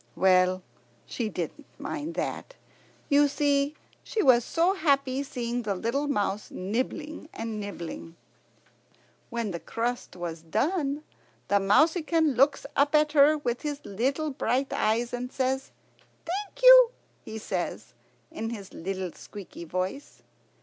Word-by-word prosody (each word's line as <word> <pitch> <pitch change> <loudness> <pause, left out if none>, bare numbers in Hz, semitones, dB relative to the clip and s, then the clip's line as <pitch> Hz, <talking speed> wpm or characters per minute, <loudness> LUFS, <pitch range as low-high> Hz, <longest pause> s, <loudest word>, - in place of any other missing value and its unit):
Well, 185 0 +4 0.4
she 230 -3 -3
didn't 180 - -5
mind 295 +3 -5
that. - - -4 0.5
You 290 0 +5
see, 285 0 +1 0.3
she 435 - -1
was 245 -3 +6
so 340 +8 +2
happy 275 -7 +1
seeing 245 -3 -3
the 205 -4 -2
little 235 +9 -1
mouse 205 -6 -1
nibbling 260 - -3
and 225 -1 -5
nibbling. 170 -4 -7 1.1
When 235 -4 -2
the 170 - -4
crust 240 +3 -3
was 170 -2 -5
done 280 - -1 0.5
the 200 - +4
mouseykin 310 - +3
looks 275 +4 +3
up 285 +2 +3
at 300 0 +4
her 300 +1 +6
with 250 -4 -2
his 295 -1 -3
little 270 +9 -1
bright 265 +1 0
eyes, 235 +3 +1
and 250 +1 -4
"Thank 265 0 0 1.0
you," - - +10 0.3
he 220 - -7
says, 220 - -4 0.4
in 225 -9 -4
a 205 - -8
little 185 0 -4
squeaky 185 -3 -10
voice. 185 - -4
255 Hz, 130 wpm, -27 LUFS, 205-295 Hz, 1.1 s, you